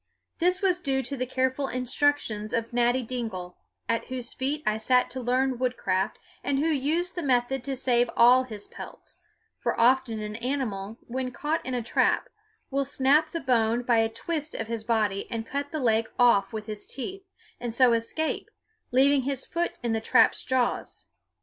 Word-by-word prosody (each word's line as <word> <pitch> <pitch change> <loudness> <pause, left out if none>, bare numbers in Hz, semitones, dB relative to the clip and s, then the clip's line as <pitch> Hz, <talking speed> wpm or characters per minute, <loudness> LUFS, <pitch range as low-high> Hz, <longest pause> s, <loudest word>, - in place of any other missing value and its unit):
This 360 +3 +2
was 365 -2 +3
due 270 -5 0
to 275 +3 -3
the 255 -1 -3
careful 260 +2 0
instructions 250 -4 0
of 230 0 -2
Natty 245 +1 +2
Dingle, 220 -7 -5 0.3
at 230 0 0
whose 255 -2 -5
feet 290 +3 -2
I 215 0 +1
sat 250 +3 +2
to 260 - -4
learn 255 +1 +1
woodcraft, 195 -7 0 0.3
and 275 0 0
who 290 - +1
used 320 +5 0
the 350 - -3
method 255 -2 +1
to 275 -1 -2
save 245 -2 +2
all 245 +2 +7
his 215 -5 -7
pelts; - - -10 0.4
for - - -1
often 240 -1 +3
an 210 0 -5
animal, 230 -5 -3
when 255 +1 -3
caught 300 +6 -2
in 255 0 -3
a 240 - -2
trap, - - +1 0.4
will 275 +1 +1
snap 280 +3 +3
the 335 +1 -4
bone 240 -2 +2
by 240 -1 +3
a 225 0 +2
twist 310 +6 -4
of 225 - -3
his 225 0 -4
body 215 -4 0
and 225 -1 -3
then - - -18
cut 285 +1 -3
the 310 - -2
leg 225 -3 +2
off 235 -6 +4
with 215 -1 -5
his 215 -1 -3
teeth, 380 +8 -6 0.3
and 240 -1 -3
so 245 +1 +4
escape, 230 +8 -1 0.4
leaving 270 +2 +4
his 270 0 -2
foot 340 +1 -2
in 235 - 0
the 225 0 0
trap's 225 0 +4
jaws. 255 -2 -1
250 Hz, 185 wpm, -27 LUFS, 230-275 Hz, 0.4 s, all